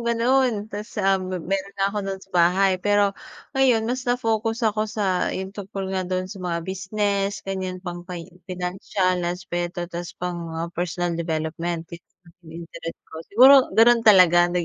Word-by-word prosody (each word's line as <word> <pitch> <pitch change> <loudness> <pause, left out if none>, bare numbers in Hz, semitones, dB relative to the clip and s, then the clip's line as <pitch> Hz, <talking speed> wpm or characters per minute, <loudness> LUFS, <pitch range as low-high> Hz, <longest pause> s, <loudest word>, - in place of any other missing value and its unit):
gano'n 235 -1 +1
tas, 210 +3 -7
ah, 195 -1 +2
m 185 - -5 0.2
meron 195 +1 -2
nga 195 0 +1
ako 210 - -2
do'n 195 - -2
sa 195 - -31
bahay 185 +2 +3
pero 205 0 +3 0.4
ngayon, 260 -5 +3
mas 250 +3 -2
na-focus 225 -1 0
ako 215 0 +1
sa 200 -4 0
'yung 190 +1 -4
tungkol 195 -1 -5
nga 185 -1 -2
do'n 185 0 -1
sa 190 +1 -9
mga 170 -2 -3
business, 200 +1 -2
ganiyan, 190 -1 -3
pang 175 -1 -5
pi 175 -2 -7 0.2
financial 185 0 -1
aspeto 175 -1 -3
tas 175 0 -6
pang 170 -1 -4
personal 175 0 -2
development 165 +1 -3
na - - -5 0.5
'yung 165 +1 -8
interest 165 0 -8 0.2
ko. - - -8
Siguro 255 +6 +8 0.2
gano'n 235 +1 +6
talaga 180 -5 +6
nag 175 0 -1
190 Hz, 165 wpm, -23 LUFS, 175-210 Hz, 0.5 s, Siguro